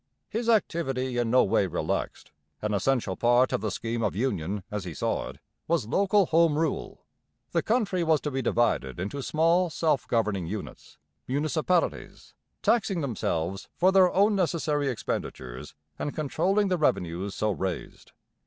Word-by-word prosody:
His 230 +1 -2
activity 135 - +1
in 120 -1 0
no 125 +2 +5
way 95 0 +2
relaxed. 85 - -3 0.3
An 105 0 -2
essential 105 -1 0
part 120 +4 +3
of 125 - 0
the 110 - -1
scheme 115 +2 -3
of 105 -4 0
union, 100 -5 -2
as 105 -2 -3
he 90 -4 -7
saw - - -1
it, - - -11 0.3
was 165 -8 +1
local 200 - +3
home 165 -2 +3
rule. 160 0 -2 0.5
The - - +1
country 210 -6 +1
was 160 -2 +3
to 150 - -3
be 135 0 -1
divided 115 - 0
into 105 +10 -4
small 165 +5 +2
self 155 -3 0
governing 105 -6 0
units 105 +3 -7 0.3
municipalities 155 +5 -1 0.3
taxing 195 -6 +2
themselves 95 - -2
for 185 +2 +4
their 190 -2 +5
own 205 +2 +3
necessary 160 -6 0
expenditures 65 - -5 0.2
and 145 - -3
controlling 185 +7 +1
the 180 -2 0
revenues 90 - 0
so 110 0 0
raised. 95 -3 -5
135 Hz, 155 wpm, -27 LUFS, 105-170 Hz, 0.5 s, no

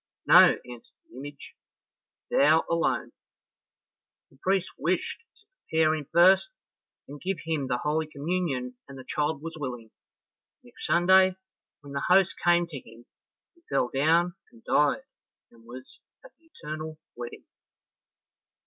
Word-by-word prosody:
"No," - - +7
answered 120 -1 -12 0.2
the - - -13
image, 145 0 -10 0.8
"thou 155 +3 +4
alone." 170 0 0 1.2
The 135 - -24
priest 190 -1 0
wished - - -2 0.2
to 420 - -27 0.2
prepare 160 -1 +3
him 150 -3 -5
first, 185 - +5 0.6
and 145 +1 -10
give 190 0 -2
him 155 -5 -2
the 125 -1 0
holy 155 +4 -1
communion 145 -5 -3
and 135 - -11
the 130 - -9
child 150 -1 -2
was 165 0 -7
willing, 120 -5 -6
and - - -63
next - - -8
Sunday, 185 +2 +5 0.5
when 140 -1 -11
the 140 - -2
host 190 0 +5
came 175 0 +4
to 160 -5 -8
him, 115 0 -17 0.5
he 340 - -29
fell 130 -3 +1
down 165 +6 +2 0.2
and 235 -1 -20
died, 145 -7 +2 0.5
and 115 -1 -21
was 125 +2 -12 0.3
at - - -14
the 330 - -31
eternal 155 - -8 0.2
wedding. 120 0 -8
155 Hz, 140 wpm, -27 LUFS, 135-175 Hz, 1.2 s, No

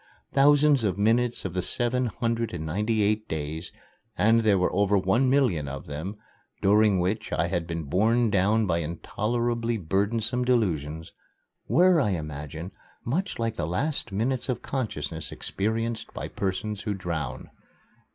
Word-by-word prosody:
Thousands 145 -1 +5
of 100 -3 0
minutes 115 +3 +1
of 90 - -3
the 90 - 0
seven 120 +6 0
hundred 115 -2 -2
and 80 -2 -4
ninety 105 +7 0
eight 105 +1 0
days 80 +2 -4 0.5
and 115 +2 +4
there 105 -3 +4
were 90 - +1
over 100 0 +3
one 105 +8 +2
million 120 - +2
of 70 0 -6
them, 80 +8 -5 0.4
during 105 0 +4
which 105 +5 -1
I 85 - 0
had 85 -2 -2
been 85 -1 -3
borne 110 - +2
down 105 +3 +3
by 85 -3 +1
intolerably 115 +8 -1
burdensome 110 +7 0
delusions 80 - 0 0.6
were, 175 - +5
I 105 -7 +1
imagine, 75 +3 -6 0.3
much 175 +11 -1
like 115 -1 -2
the 75 - -1
last 120 - -1
minutes 125 +6 -1
of 125 -2 -2
consciousness 80 - -4
experienced 115 +3 -2
by - - -4
persons 100 +2 -3
who 105 -2 -2
drown. 85 -8 -4
105 Hz, 150 wpm, -26 LUFS, 85-120 Hz, 0.6 s, Thousands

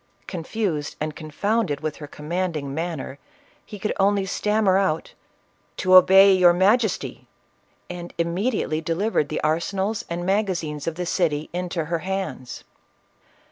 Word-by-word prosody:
Confused 170 -3 -3
and 155 0 -3
con 155 - -9
founded 205 -1 0
with 155 -1 -3
her 150 - -8
commanding 155 -2 -3
manner, 160 -4 -4 0.4
he 210 - -10
could 210 +2 -2
only 200 0 +3
stammer 210 0 +1
out, 165 -5 -1 0.3
" - - -41
To 185 -1 +1
obey 190 +2 +8
your 180 -2 +6
majesty 205 +4 +1 0.3
!" - - -41 0.3
and 175 -1 -7
immedi 180 +8 0
ately 155 +1 -2
delivered 165 -1 0
the 155 - -2
arsenals 190 +8 -1
and 175 +1 -3
magazines 180 -7 -1
of 165 - -2
the 180 +1 -3
city 160 -4 -1
into 175 -2 -2
her 165 +2 -2
hands. 185 -8 -5
175 Hz, 145 wpm, -23 LUFS, 155-195 Hz, 0.4 s, obey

